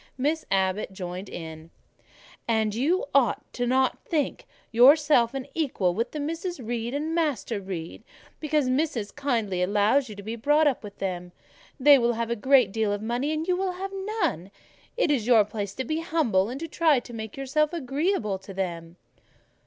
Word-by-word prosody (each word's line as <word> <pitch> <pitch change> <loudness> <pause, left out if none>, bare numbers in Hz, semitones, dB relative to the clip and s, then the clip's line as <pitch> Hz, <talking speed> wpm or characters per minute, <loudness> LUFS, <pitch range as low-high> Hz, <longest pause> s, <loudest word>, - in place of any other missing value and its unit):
Miss 300 +5 0
Abbot 190 +1 0
joined 185 0 -6
in— 160 -1 -8 0.8
"And 220 -2 +1
you 295 - +1
ought 260 -6 +2
not 255 +1 +1
to - - -29
think 305 -4 -1 0.2
yourself 265 0 +5
on 270 - -3
an 280 - -19
equality 230 - 0
with 230 +4 -1
the 305 - -5
Misses 330 +3 -4
Reed 240 +1 -3
and 310 +3 -2
Master 285 -10 -1
Reed, 185 0 -6 0.4
because 305 -3 0
Missis 255 -5 -1
kindly 230 -10 -1
allows 210 +8 +2
you 210 - -8
to 200 - -9
be 220 +3 -4
brought 295 +7 +3
up 275 -6 +1
with 205 -1 -10
them. 180 -2 -4 0.5
They 285 +1 +7
will 240 0 +2
have 230 0 -3
a - - +1
great 250 -2 +4
deal 220 -1 0
of 205 +1 -3
money, 245 +6 -1
and 315 +1 -2
you 365 - +2
will 375 0 -1
have 385 +2 -5 0.3
none: 185 - -1 0.5
it 410 -11 +2
is 245 -6 0
your 225 -4 +6
place 205 -2 -5
to 260 - -2
be 310 +5 -2
humble, 260 - +1
and 260 +3 -5
to 330 - -3
try 320 -3 +3
to 240 0 -12
make 220 0 -7
yourself 290 +3 +1
agreeable 280 - -1
to 190 0 -11
them." 170 -3 -4
240 Hz, 185 wpm, -26 LUFS, 205-295 Hz, 0.8 s, They